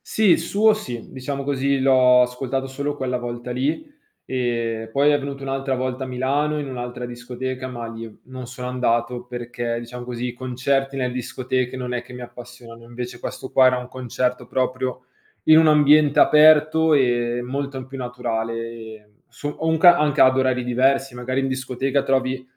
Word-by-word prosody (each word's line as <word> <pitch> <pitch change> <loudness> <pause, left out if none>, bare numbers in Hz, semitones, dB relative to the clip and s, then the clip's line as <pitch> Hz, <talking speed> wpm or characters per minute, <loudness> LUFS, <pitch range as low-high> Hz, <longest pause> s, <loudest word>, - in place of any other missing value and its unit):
Sì, 215 -4 +3
i - - +6
suo 205 +6 +3
sì. 125 - -7
Diciamo 140 +1 -5
così, 140 0 0
l'ho 130 -1 +5
ascoltato 130 +2 -3
solo 140 +2 -4
quella 130 -3 -2
volta 120 0 -6
lì, 140 - -1 0.4
ehm, 115 -3 -2
poi 140 +4 +3
è 145 - +2
venuto 140 0 -6
un'altra 135 0 -2
volta 130 +1 -3
a - - -7
Milano, 140 +4 0
in 145 - -4
un'altra 125 -1 -5
discoteca, 125 +1 -6
ma 120 -2 -6
lì 115 0 -8
non 130 -1 -9
sono 125 0 -7
andato 125 -1 -1
perché, 120 -1 -4
diciam 120 +1 -8
così, 120 0 -4
i - - -7
concerti 135 +2 -1
nel 125 -2 -1
discoteche 130 +1 -3
non 125 -1 -4
è 125 - -2
che 120 +1 -14
mi 125 - -8
appassioni, 120 -1 -11
invece 120 +1 -7
questo 130 - -7
qua 130 -1 +6
era 125 0 +2
un 125 0 -6
concerto 125 -1 -3
proprio 130 0 -2 0.4
in 155 0 +7
un 160 - +5
ambiente 150 -1 +5
aperto 155 +1 +5
e 120 -2 +1
molto 135 +2 -4
m 130 - -8
più 135 +1 -9
naturale, 120 -2 -3 0.4
ehm, 105 -1 -18 0.2
so 145 - -6
ho 160 +2 -4
un 160 0 +2
ca 175 +2 +7
anche 150 -2 +1
ad 130 0 +6
orari 130 -1 +1
diversi. 130 +2 +1
Magari 130 +2 -2
in 135 - -1
discoteca 130 +1 -1
trovi 130 -1 0
130 Hz, 185 wpm, -22 LUFS, 125-135 Hz, 0.4 s, in